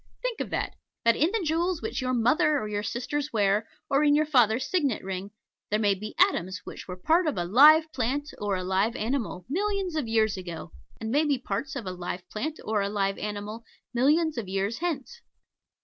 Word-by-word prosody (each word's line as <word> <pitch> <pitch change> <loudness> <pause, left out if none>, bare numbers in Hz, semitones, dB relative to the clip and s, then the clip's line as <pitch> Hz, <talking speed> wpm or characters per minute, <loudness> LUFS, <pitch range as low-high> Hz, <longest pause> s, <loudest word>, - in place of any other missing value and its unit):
Think - - -2
of - - -3
that - - -2 0.3
that 230 - +5
in 315 - +3
the 445 -3 -1
jewels 335 +2 +1
which - - -2
your 255 0 0
mother 300 +7 +3
or 215 - -3
your 205 -1 -2
sisters 260 +7 -3
wear, 210 0 +1 0.2
or 275 +2 +2
in 290 -1 +5
your 305 +1 +3
father's 250 -4 +3
signet 285 - 0
ring, 190 +1 -4 0.4
there 210 - +2
may 205 -2 +3
be 210 +3 -7
atoms 190 - +2
which - - -9
were 180 - -5
part 325 - +2
of 290 - -1
a 175 - 0
live 295 - +8
plant, 275 +4 -2
or 205 -1 0
a 185 - -3
live 190 +5 +1
animal, 225 -7 -2
millions 390 +3 -1
of 300 -7 -1
years 220 -2 +2
ago, 175 -2 -7 0.3
and 220 0 -4
may 290 +4 +3
be 290 -3 +2
parts 250 +6 -4
of 255 -6 -4
a 185 - -3
live 180 0 -6
plant 300 +9 -3
or 215 -1 +1
a 200 - -1
live 195 -1 -1
animal 210 +2 -5 0.3
millions 295 +3 +2
of 210 - -5
years 195 +4 -1
hence. 350 - -3
235 Hz, 210 wpm, -27 LUFS, 205-305 Hz, 0.4 s, live